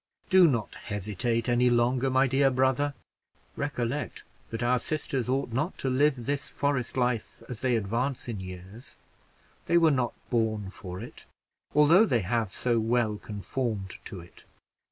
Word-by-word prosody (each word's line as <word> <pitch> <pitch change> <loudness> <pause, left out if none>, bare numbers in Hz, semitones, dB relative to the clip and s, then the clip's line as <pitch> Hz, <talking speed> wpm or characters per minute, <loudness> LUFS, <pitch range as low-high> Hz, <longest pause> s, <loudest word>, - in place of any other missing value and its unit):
Do 185 -2 +8
not 115 -8 -1
hesitate 110 +3 -2
any 125 0 +4
longer, 120 +2 +2
my 130 +1 +4
dear 135 +1 +3
brother; 130 +2 +1 0.6
recollect 140 -1 -3 0.3
that 115 +1 -3
our 125 +1 +3
sisters 135 -3 -2
ought 135 -1 0
not 150 +9 -1
to 135 - -1
live 135 -2 +2
this 140 +2 -1
forest 140 -4 -1
life 125 -2 -1
as 125 -4 -6
they 125 -2 +2
advance 115 +6 -1
in 115 -4 -4
years 95 +5 -8 0.7
they 170 - +4
were 165 -2 +5
not 125 -4 0 0.2
born 110 -4 0
for 90 -2 -8
it, 120 +4 -10 0.5
although 165 +9 +6
they 120 - +2
have 110 +1 -1
so 120 +1 +1
well 110 -1 +1
conformed 105 -2 -4
to 95 - -6
it. 85 - -15
120 Hz, 155 wpm, -28 LUFS, 110-135 Hz, 0.7 s, Do